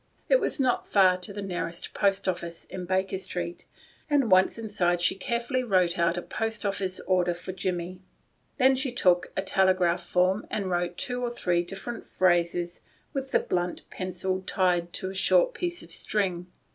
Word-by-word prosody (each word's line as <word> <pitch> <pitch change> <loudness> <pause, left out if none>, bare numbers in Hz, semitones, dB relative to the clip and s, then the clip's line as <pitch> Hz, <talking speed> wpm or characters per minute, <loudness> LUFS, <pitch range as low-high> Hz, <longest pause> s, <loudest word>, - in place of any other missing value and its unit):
It - - +6
was - - +1
not 255 -2 +1
far 185 -2 +5
to 180 - -7
the 200 0 -5
nearest 175 -3 -4
post 200 -1 +1
office, 170 -2 -3
in 180 -1 -6
Baker 190 +1 0
Street, 175 -2 -5 0.4
and 280 -7 +2
once 185 +3 +5
inside 185 -6 0
she 175 - +3
carefully 235 +6 -1
wrote 185 -7 +2
out 170 0 +2
a 175 - -3
post 225 -1 -3
office 195 -2 -1
order 180 -2 +1
for 175 +2 -6
Jimmie. 180 -1 -3 0.6
Then 265 -1 +5
she 265 0 0
took 180 -7 +2
a 190 - +1
telegraph 185 -3 +2
form 185 +3 +1
and 195 -3 -2
wrote 175 0 -1
two 245 -1 -2
or 245 - 0
three 180 -7 0
different 195 +6 -6
phrases 175 -1 +1 0.3
with 270 -2 -3
the - - +3
blunt 175 0 -2
pencil 185 0 -2
tied 175 -2 +1
to 190 - -2
a - - -8
short - - +3
piece 350 -1 -3
of - - -14
string. 180 -4 -1
185 Hz, 175 wpm, -27 LUFS, 175-215 Hz, 0.6 s, It